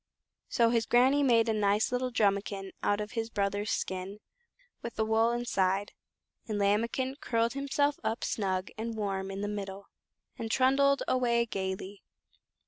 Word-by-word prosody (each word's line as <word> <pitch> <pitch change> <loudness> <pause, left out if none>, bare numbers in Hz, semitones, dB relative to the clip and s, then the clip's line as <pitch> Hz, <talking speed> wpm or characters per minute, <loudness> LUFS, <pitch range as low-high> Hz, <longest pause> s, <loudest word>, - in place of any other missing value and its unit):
So 235 -2 +3
his 230 -1 +1
Granny 260 +4 +4
made 235 -4 +4
a 225 - +2
nice 210 +1 +2
little 250 +1 0
drumikin 200 -3 0
out 205 0 +1
of 210 0 -4
his 225 -2 -3
brother's 205 -1 -1
skin, 190 +1 -3 0.6
with 235 - -6
the 220 - 0
wool 220 +1 +3
inside, 200 -5 0 0.6
and 215 -2 -2
Lambikin 230 +6 0
curled 230 0 0
himself 280 +1 0
up 220 +1 -2
snug 190 -3 -1
and 225 0 -4
warm 195 -2 -2
in 195 0 -5
the 205 - -2
middle, 200 -1 -6 0.5
and 225 - -3
trundled 275 +3 +3
away 235 -2 +2
gaily. 190 -1 -4
220 Hz, 150 wpm, -30 LUFS, 200-240 Hz, 0.6 s, Granny